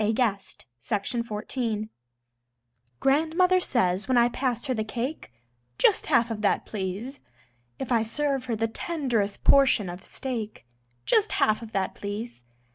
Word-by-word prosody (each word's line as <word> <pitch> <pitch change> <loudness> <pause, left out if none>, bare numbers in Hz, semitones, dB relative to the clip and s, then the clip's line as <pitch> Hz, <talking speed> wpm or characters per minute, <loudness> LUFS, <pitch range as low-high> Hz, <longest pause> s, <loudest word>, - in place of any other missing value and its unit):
JUST 215 -2 -1 0.2
HALF 205 - +1
OF 235 -1 -2
THAT, 210 -1 -5
PLEASE 225 -4 -2 1.1
Grandmother 325 +6 +3
says 200 - +1
when 260 -1 +2
I 240 0 +5
pass 245 -1 -2
her 260 - 0
the 220 -3 -1
cake: 240 - -4 0.5
"Just - - +3
half 235 0 +3
of 215 -2 -4
that, 205 - +1
please." 210 +7 -5 0.6
If 260 - -5
I 230 -2 +4
serve 270 +4 -1
her 240 -3 -1
the 225 +1 0
tenderest 235 -7 -2
portion 260 -8 +5
of 180 +2 -9
steak: 225 - -5 0.4
"Just 430 -1 +3
half 215 +1 +2
of 225 -1 -9
that, 195 -1 -1
please." 205 - -6
230 Hz, 150 wpm, -26 LUFS, 210-265 Hz, 1.1 s, I